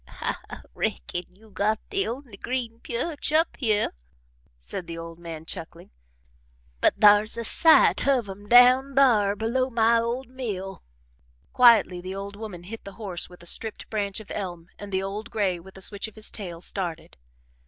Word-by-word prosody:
"I - - -6
reckon 175 - -3
you 215 +2 -20
got 215 +2 0
the 395 -1 0
only 245 -2 -6
green 235 +1 -4
pyerch 290 +7 -3
up 320 +2 +3
hyeh," 215 -5 +1 0.7
said - - -7
the 165 0 -6
old 165 0 -8
man, 165 -2 -8
chuckling, 165 -1 -9 0.9
"but - - +3
thar's 210 +1 +6
a 230 - -2
sight 320 +4 +5
of 255 -6 +2
'em 200 +1 -9
down 255 +3 +6
thar 220 -7 +4
below 235 +5 0
my 230 -1 +3
old 235 +3 -2
mill." 210 -7 -5 0.7
Quietly 225 -7 +5
the 185 +1 -6
old 200 +1 -6
woman 205 -5 -8
hit 220 +5 -8
the 200 - -9
horse 190 -4 -4
with 180 -1 -15
a - - -13
stripped 220 +5 -3
branch 205 -2 -2
of 215 - -12
elm 175 -4 -5
and 205 -1 -8
the 190 0 0
old 210 +4 -5
gray, 195 -5 0
with 190 +3 -14
a - - -11
switch 200 +2 -3
of 220 - -14
his 215 -1 -5
tail, 175 -5 -6
started. 175 -4 -5
210 Hz, 175 wpm, -26 LUFS, 185-235 Hz, 0.9 s, thar's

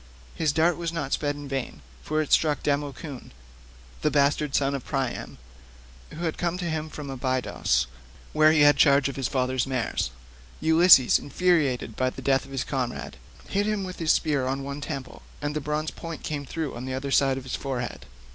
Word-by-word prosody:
His 155 -3 +1
dart 160 +3 +2
was 170 -1 -3
not 150 -5 -3
sped 145 -1 0
in 145 -1 -8
vain, 135 - -4 0.2
for 155 - 0
it 150 - -9
struck 150 -2 +3
Democoon, 145 -1 -3 0.7
the - - +2
bastard 145 0 +2
son 140 0 +2
of 135 -3 -3
Priam, 135 -3 -3 0.7
who 160 - -9
had 160 - -2
come 175 0 -1
to 180 - -4
him 155 0 -3
from 145 -3 -7
Abydos, 130 - 0 0.5
where 155 0 +6
he 155 -2 +4
had 145 0 +6
charge 140 -2 +5
of 140 - -6
his 135 -2 -1
father's 130 -1 0
mares. 130 -5 -1 0.5
Ulysses, 160 -5 +6
infuriated 145 -9 +1
by 130 0 +1
the 130 - -10
death 135 0 +2
of 135 - -14
his 135 -1 -2
comrade, 125 -3 -4 0.3
hit 205 +1 0
him 210 -2 0
with 185 -1 -7
his 160 -2 +3
spear 140 -4 +1
on 135 +1 -2
one 140 +1 -5
temple, 140 -3 -6 0.2
and 145 0 -3
the 150 - -1
bronze 150 +2 -2
point 165 -1 -8
came 145 -3 -4
through 160 -1 -3
on 120 +2 -6
the 130 0 -3
other 135 +1 -4
side 135 -1 +3
of 135 - -6
his 130 - -7
forehead. 125 -4 -4
140 Hz, 195 wpm, -26 LUFS, 135-155 Hz, 0.7 s, where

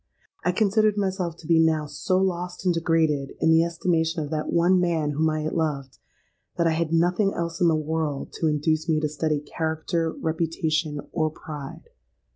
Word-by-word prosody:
I 180 - +2
considered 215 +2 +2
myself 185 -4 -1
to 165 - -14
be 165 -1 +4
now 160 -2 +3
so 185 +6 -1
lost 180 -1 -2
and 180 - +3
degraded 160 -4 +1
in 160 - +3
the 160 0 +5
estimation 165 -1 0
of 145 - -7
that 155 -1 -2
one 175 +2 +4
man 165 -4 +1
whom 155 +2 +1
I 155 0 -1
had 155 - -2
loved, 140 -5 -2 0.6
that 170 - +2
I 165 - +3
had 160 0 -1
nothing 180 +4 +2
else 170 +2 -3
in 175 - +5
the 165 - +4
world 155 -2 -2
to 165 - +1
induce 155 +2 0
me 155 -1 +3
to 155 - 0
study 150 0 -1
character, 160 +2 -2
reputation, 160 -2 -1
or 155 -2 0
pride. 150 -2 -9
160 Hz, 185 wpm, -25 LUFS, 155-175 Hz, 0.6 s, the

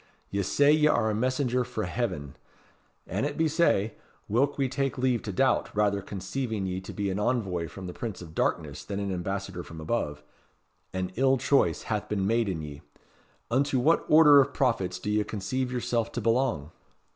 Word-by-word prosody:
"Ye 100 - 0
say 140 +9 +3
ye 150 0 +4
are 110 -7 +2
a - - -1
messenger 125 +2 0
frae 115 -4 -4
heaven. 90 - -3 0.7
An 100 +7 -2
it 145 0 -2
be 160 - +3
sae, 150 - +2 0.3
whilk 135 +7 +1
we 135 -2 +1
take 135 0 -2
leave 125 -2 +1
to 105 - -5
doubt, 130 +8 +2
rather 100 -1 +2
conceiving 100 +3 -4
ye 95 0 -3
to 95 - -8
be 100 -2 -2
an 95 - -2
envoy 100 -7 0
from 95 +5 -9
the 90 - -6
Prince 115 -5 -5
of 80 -3 -10
Darkness 75 -3 -1
than 100 -1 -4
an 100 -1 -2
ambassador 95 0 -4
from 80 -1 -10
above, 75 -4 -2 0.7
an 95 0 -3
ill 135 +1 +4
choice 120 - +2
hath - - -3
been 100 -2 0
made 115 0 +1
in 80 -4 -3
ye. 75 -1 -8 0.7
Unto 135 +2 +2
what 150 +7 +3
order 150 -2 +8
of 140 +1 -2
prophets 100 -9 +1
do 100 +3 -3
ye 105 0 +2
conceive 125 +6 -3
yourself 120 -2 -1
to - - -2
belong?" 115 - 0
110 Hz, 190 wpm, -28 LUFS, 95-130 Hz, 0.7 s, order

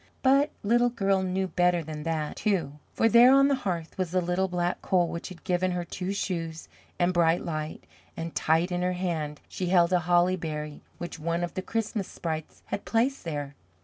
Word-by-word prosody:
But 275 +3 +5
Little 240 +3 +3
Girl 195 -5 +1
knew 190 +1 -1
better 175 -1 +2
than 155 -1 -6
that, 155 -2 -2
too, 160 -9 -1
for 225 - +2
there 235 +3 +7
on 275 +1 +6
the - - +3
hearth 185 -10 -3
was 185 -2 0
the 185 +2 +1
little 180 +2 0
Black 175 -1 -1
Coal, 180 -2 +2
which 170 0 -5
had 185 -2 -12
given 185 0 +1
her 175 -1 -2
Two 180 +2 -4
Shoes 165 -5 -3 0.3
and 175 +1 +2
Bright 170 -1 +2
Light, 155 -2 -4 0.3
and 165 0 -4
tight 165 +3 +2
in 175 0 -1
her 180 0 +1
hand 160 -5 -3
she 185 - -4
held 175 -1 +4
a 180 - +5
holly 175 +2 +3
berry 150 -3 -5 0.2
which 175 0 -6
one 170 +2 -1
of 175 - -3
the 185 - -3
Christmas 215 -1 -2
Sprites 160 -2 -5
had - - -4
placed 245 +2 0
there. 145 -3 -4
175 Hz, 200 wpm, -27 LUFS, 165-190 Hz, 0.3 s, there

